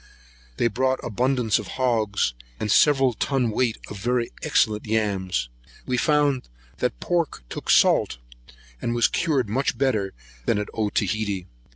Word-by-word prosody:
They - - +1
brought 130 +4 +1
abundance 125 0 +1
of - - -7
hogs, 110 - +1 0.3
and 105 - -1
several 135 -2 +5
ton 125 0 0
weight 115 +1 0
of 105 - -8
very 120 +2 0
excellent 105 -1 +1
yams. 95 - 0 0.4
We 125 - -1
found 145 - +2 0.3
that - - -1
the - - -9
pork 170 - 0
took - - -7
salt, - - +4 0.6
and 120 - -1
was 120 -1 +4
cured 145 - 0
much 130 +7 -1
better 130 -6 +2
here 95 - -9 0.3
than - - +3
at 105 - -3
Otaheite. 105 -3 -1
115 Hz, 150 wpm, -24 LUFS, 105-130 Hz, 0.6 s, several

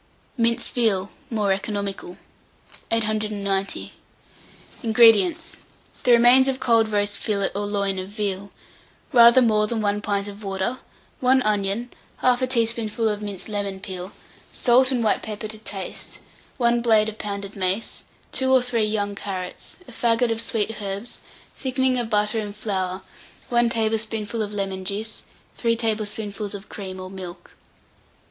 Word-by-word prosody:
MINCED 235 -1 +1
VEAL. 205 -5 +1 0.2
(More 210 -4 +1
Economical.) 195 -2 -4 0.7
890. 210 -3 -1 0.9
INGREDIENTS. 235 - +4 0.4
The 250 - +3
remains 245 +3 +7
of 265 -1 0
cold 230 -4 +3
roast 205 0 +1
fillet 200 -3 0
or 205 +1 -2
loin 200 -2 0
of 185 +1 -6
veal, 200 -2 -3 0.6
rather 235 +1 +8
more 215 -2 +3
than 230 0 -2
1 205 -1 0
pint 200 -1 -1
of 205 +1 -9
water, 195 +6 -2 0.4
1 260 0 +4
onion, 210 +3 0 0.3
1/2 255 0 +3
teaspoonful 230 -2 +1
of 210 -1 -1
minced 200 -3 -5
lemon 200 -2 -3
peel, 190 -1 -6 0.4
salt 255 +2 +4
and 245 -3 +1
white 215 - +2
pepper 215 0 -5
to 215 0 -9
taste, 195 -3 -6 0.4
1 235 -2 +3
blade 220 -2 +4
of 220 0 -6
pounded 200 -1 -5
mace, 190 +3 -1 0.3
2 260 0 +1
or 260 -1 +6
3 240 -3 +1
young 210 -1 0
carrots, 190 -2 -5
a - - -11
faggot 230 0 +2
of 225 0 0
sweet 225 -1 -2
herbs, 200 +4 -5 0.3
thickening 260 -1 +1
of 235 -2 -3
butter 210 +1 +1
and 205 -1 -5
flour, 190 -3 -3 0.5
1 240 -1 +3
tablespoonful 225 -1 -1
of 210 -1 -3
lemon 195 -2 -3
juice, 210 +3 -3 0.3
3 230 -1 +2
tablespoonfuls 215 -2 -2
of 200 +1 -10
cream 190 -2 -7
or 185 0 -7
milk. 185 -2 -9
215 Hz, 145 wpm, -24 LUFS, 200-235 Hz, 0.9 s, rather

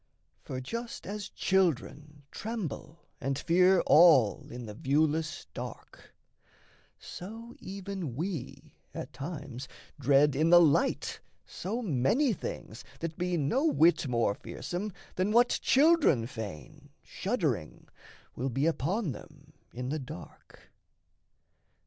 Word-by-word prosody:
For 130 - -5
just 230 - -6
as 205 +1 -5
children 150 -5 0
tremble 200 -7 -6
and 135 0 -2
fear 180 +4 +4
all 150 -10 +5
In 120 0 -7
the 105 - -7
viewless 155 +6 0
dark, - - -9 0.8
so 225 +6 -9
even 190 -8 -6
we 165 -3 -5 0.2
at - - -6
times 140 -4 -6 0.3
Dread 140 +1 +4
in 155 +4 +2
the 175 0 +9
light 155 -5 +2 0.3
so 225 +7 -4
many 210 - +2
things 120 - -7 0.2
that 165 -1 -4
be 180 0 -1
No 240 - +1
whit 165 - +4
more 115 -4 +1
fearsome 180 - -5 0.3
than 185 +3 +1
what 240 +2 +4
children 285 - +4
feign, 125 - -8
Shuddering, 155 - -2 0.5
will 130 +2 -2
be 135 +4 0
upon 180 +3 0
them 150 +3 -13 0.2
in 125 +1 -5
the 155 +2 -2
dark. 150 +4 -11
155 Hz, 115 wpm, -30 LUFS, 135-190 Hz, 0.8 s, the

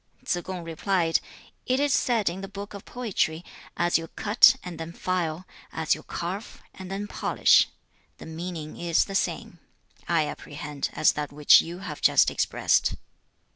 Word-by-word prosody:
2. - - -27
Tsze 175 -1 -1
kung 185 -2 -6
replied, 165 0 0 0.5
'It 255 +1 +2
is 285 -1 +2
said 230 -5 +1
in 180 +3 -1
the 195 - -6
Book 200 +1 -8
of 200 - -9
Poetry, 185 -9 -2 0.3
"As 175 -1 +2
you 165 - -7
cut 215 +8 +5
and 175 -2 -8
then 165 +1 -6
file, 180 -1 -2 0.3
as 160 -1 +1
you 155 - -5
carve 185 +8 -6
and 190 -1 -10
then 195 +2 -4
polish." - - +3 0.5
The - - -11
meaning 160 -1 -6
is 170 -1 +2
the 195 - -8
same, 175 -2 -2 0.5
I 165 -3 +2
apprehend, 150 -1 -5
as 155 - +4
that 150 -1 -4
which 145 0 +6
you 175 +3 -8
have 150 -4 -7
just - - +5
expressed.' - - +1
175 Hz, 170 wpm, -26 LUFS, 160-195 Hz, 0.5 s, which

